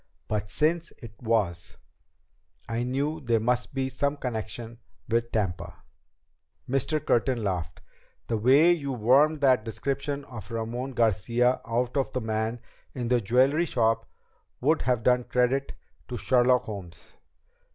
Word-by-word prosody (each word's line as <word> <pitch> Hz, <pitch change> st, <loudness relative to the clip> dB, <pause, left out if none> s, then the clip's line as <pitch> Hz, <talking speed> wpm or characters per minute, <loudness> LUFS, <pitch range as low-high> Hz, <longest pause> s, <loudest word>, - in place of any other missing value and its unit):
But 105 Hz, -1 st, -2 dB
since 165 Hz, -, +1 dB
it 115 Hz, -4 st, -11 dB
was, 105 Hz, -7 st, -1 dB, 0.9 s
I 115 Hz, +1 st, -2 dB
knew 140 Hz, +6 st, -1 dB
there 120 Hz, -5 st, +1 dB
must 120 Hz, +2 st, 0 dB
be 135 Hz, -1 st, 0 dB
some 140 Hz, +2 st, -1 dB
connection 115 Hz, -1 st, -5 dB, 0.3 s
with 115 Hz, +1 st, 0 dB
Tampa." 95 Hz, -5 st, -3 dB, 0.8 s
Mr. 135 Hz, +4 st, 0 dB
Curtin 120 Hz, -1 st, +1 dB
laughed. 85 Hz, -6 st, -3 dB, 0.4 s
"The 115 Hz, -, -1 dB
way 140 Hz, +9 st, +6 dB
you 140 Hz, -6 st, -1 dB
wormed 140 Hz, +7 st, +3 dB
that 130 Hz, -5 st, +4 dB
description 140 Hz, +5 st, -3 dB
of 120 Hz, -3 st, -9 dB
Ramon 120 Hz, +3 st, -4 dB
Garcia 120 Hz, +3 st, +2 dB
out 120 Hz, +2 st, -1 dB
of 135 Hz, -, 0 dB
the 130 Hz, -, -1 dB
man 110 Hz, +1 st, -2 dB, 0.3 s
in 120 Hz, -3 st, -3 dB
the 125 Hz, -1 st, +3 dB
jewelry 130 Hz, -, +3 dB
shop 115 Hz, -5 st, 0 dB, 0.5 s
would 155 Hz, +5 st, +2 dB
have 125 Hz, -3 st, 0 dB
done 125 Hz, 0 st, +3 dB
credit 125 Hz, +3 st, 0 dB, 0.3 s
to 125 Hz, -, -5 dB
Sherlock 125 Hz, +2 st, +3 dB
Holmes." 95 Hz, -4 st, -9 dB
125 Hz, 135 wpm, -27 LUFS, 115-135 Hz, 0.9 s, way